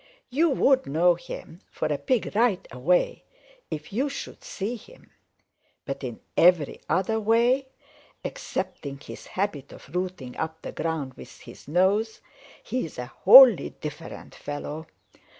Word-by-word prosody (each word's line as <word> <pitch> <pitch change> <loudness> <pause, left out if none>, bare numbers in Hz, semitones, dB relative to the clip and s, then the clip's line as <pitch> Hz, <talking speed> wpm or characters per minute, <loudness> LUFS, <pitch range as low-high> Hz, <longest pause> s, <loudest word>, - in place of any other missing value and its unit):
You 320 +6 +3
would 265 -1 +3
know 170 +5 +4
him 175 +1 -9
for - - -4
a 145 - 0
Pig 235 - 0
right 220 -4 +2
away 155 +9 +1 0.5
if 155 +4 -6
you 265 +7 0
should 280 - -7
see 215 +5 -4
him. 485 - -16 0.7
But 135 0 -5
in 120 -3 -5 0.2
every 170 -4 +4
other 190 +6 +1
way 235 +5 +3 0.6
excepting 140 - -4
his - - -10
habit 170 -8 -3
of 140 - -14
rooting 180 -9 -3
up 160 0 -4
the - - -5
ground 160 -5 -3
with - - -13
his - - -13
nose, 195 +7 +2 0.4
he 255 - -2
is 160 - -8
a 125 - -4 0.2
wholly 245 +1 +9
different 150 +2 -8
fellow. 150 +2 -6
180 Hz, 140 wpm, -26 LUFS, 150-230 Hz, 0.7 s, wholly